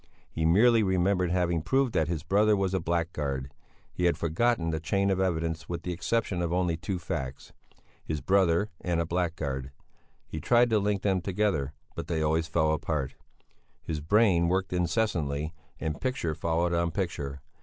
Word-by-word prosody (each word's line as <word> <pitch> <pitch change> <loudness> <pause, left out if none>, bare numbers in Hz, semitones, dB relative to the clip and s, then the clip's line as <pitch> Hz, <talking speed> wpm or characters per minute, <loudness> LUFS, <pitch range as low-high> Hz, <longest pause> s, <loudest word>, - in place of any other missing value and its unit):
He 80 0 0
merely 115 +7 +5
remembered 95 -2 +2
having 85 -2 +1
proved 135 - +1
that 80 - +2
his 80 -3 -3
brother 105 +4 +3
was 95 -1 0
a 95 - +2
blackguard; 80 -6 -2 0.4
he 90 - -1
had 85 - +3
forgotten 85 +1 +1
the 80 - -1
chain 100 +5 +1
of 95 - 0
evidence 80 -3 -1
with 85 -1 -4
the 90 - -2
exception 95 0 -1
of 85 -1 -1
only 90 -1 +1
two 90 +4 -3
facts: 70 -6 -5 0.5
his 80 -1 -3
brother 95 +5 +2
and 85 -2 0
a 85 - +1
blackguard: 80 -6 -2 0.6
he 80 - -6
tried 120 +6 +4
to 110 - +4
link 100 -1 0
them 95 -2 +2
together, 95 -7 0 0.2
but - - -6
they 80 -3 0
always 80 +1 +1
fell 80 -2 +2
apart. 75 -3 -2 0.7
His 80 -2 -3
brain 90 0 +4
worked 95 +1 0
incessantly 80 -5 0 0.3
and 80 -1 -3
picture 130 -12 -1
followed 85 +2 0
on 85 0 +1
picture. 75 -7 -3
85 Hz, 170 wpm, -28 LUFS, 80-95 Hz, 0.7 s, merely